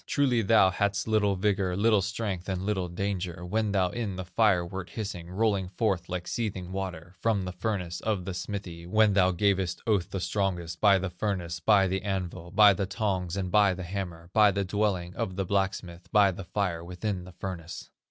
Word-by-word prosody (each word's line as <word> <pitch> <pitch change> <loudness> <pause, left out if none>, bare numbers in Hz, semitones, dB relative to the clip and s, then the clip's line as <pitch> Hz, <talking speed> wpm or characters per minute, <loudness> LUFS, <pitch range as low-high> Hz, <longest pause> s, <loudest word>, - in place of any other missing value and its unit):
Truly 130 -5 +2
thou 105 -3 +5
hadst 100 +2 0
little 105 -2 +2
vigor, 95 -2 0
Little 105 0 +4
strength, 100 -1 -3
and 95 -1 -2
little 95 -3 -1
danger, 90 -1 -3
When 110 +3 0
thou 95 -3 +2
in 105 -1 -3
the 95 0 -5
fire 90 -1 +2
wert 95 +1 -6
hissing, 90 -6 -5
Rolling 100 -1 0
forth 95 -2 -1
like 90 -1 -4
seething 95 -6 -3
water, 90 -3 -5
From 105 -5 +1
the 90 - -4
furnace 90 -2 -3
of 105 -5 -1
the 95 - -4
smithy, 90 -2 -6
When 110 +2 +4
thou 95 -2 +4
gavest 95 -1 +1
oath 100 -5 +1
the 95 - -3
strongest, 90 -3 -2
By 100 -2 +6
the 95 -1 -3
furnace, 90 -3 -3
by 100 +2 +4
the 95 +1 -1
anvil, 90 -3 -4
By 105 +2 +7
the 95 +1 -2
tongs, 95 -4 -2
and 95 -2 -2
by 100 -3 +4
the 95 - -6
hammer, 90 -2 -6
By 105 -1 +6
the 100 0 -1
dwelling 95 -3 -1
of 95 0 -3
the 95 0 -1
blacksmith, 95 -2 -2
By 105 -3 +5
the 95 0 -8
fire 90 -3 -2
within 90 +2 -4
the 90 - -12
furnace. 90 -2 -7
95 Hz, 195 wpm, -28 LUFS, 90-100 Hz, -, By